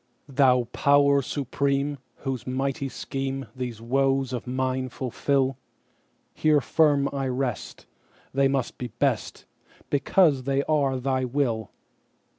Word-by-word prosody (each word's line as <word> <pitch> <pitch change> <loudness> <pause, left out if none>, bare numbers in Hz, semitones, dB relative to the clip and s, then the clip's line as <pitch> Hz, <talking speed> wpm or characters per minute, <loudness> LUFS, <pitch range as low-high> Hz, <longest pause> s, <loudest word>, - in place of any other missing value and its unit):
Thou 130 -2 +4
Power 140 0 +4
Supreme, 140 +1 -1 0.2
whose 130 -3 -4
mighty 135 +1 -2
schemeThese 135 -3 -5
woes 135 +2 +1
of 125 0 -4
mine 130 0 -1
fulfil, 135 +1 -1 0.7
Here 155 -1 +3
firm 145 +1 +3
I 135 -1 -1
rest; 125 -3 -3 0.5
they 135 0 +3
must 135 -3 -2
be 125 - -3
best, 120 +1 -2 0.5
Because 145 -1 +3
they 140 0 +1
are 140 -4 +1
Thy 130 0 0
will! 120 -5 -1
135 Hz, 110 wpm, -26 LUFS, 130-140 Hz, 0.7 s, Thou